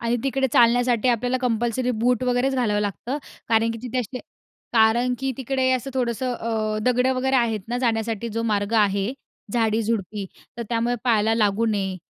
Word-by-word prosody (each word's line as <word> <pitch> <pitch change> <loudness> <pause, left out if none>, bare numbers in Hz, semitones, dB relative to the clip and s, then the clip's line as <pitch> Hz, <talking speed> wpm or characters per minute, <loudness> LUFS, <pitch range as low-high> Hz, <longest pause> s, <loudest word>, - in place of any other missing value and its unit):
आणि 235 +1 0
तिकडे 270 0 +1
चालण्यासाठी 240 0 +4
आपल्याला 245 +1 +1
कंपल्सरी 240 +1 0
बूट 245 +1 +2
वगैरेच 250 +2 +1
घालावं 215 -5 +1
लागतं, 210 - -3 0.3
कारण 225 0 +3
की 230 - -5
तिथे 255 0 -3
असे 250 +2 -4 0.5
कारण 235 +2 +3
की 270 0 -2
तिकडे 265 0 0
असं 255 +2 -2
थोडंसं 250 0 -1
अ, 220 -2 -2
दगडं 250 +2 +2
वगैरे 265 +1 +1
आहेत 225 -3 +1
ना, 240 +1 -1
जाण्यासाठी 230 -2 -1
जो 230 +1 -3
मार्ग 210 -1 -1
आहे 200 +2 0 0.4
झाडी-झुडपी. 220 -3 0 0.3
तर - - -2
त्यामुळे 235 +1 0
पायाला 225 -2 +3
लागू 215 0 +2
नये. 195 -3 -1
235 Hz, 165 wpm, -23 LUFS, 220-250 Hz, 0.5 s, चालण्यासाठी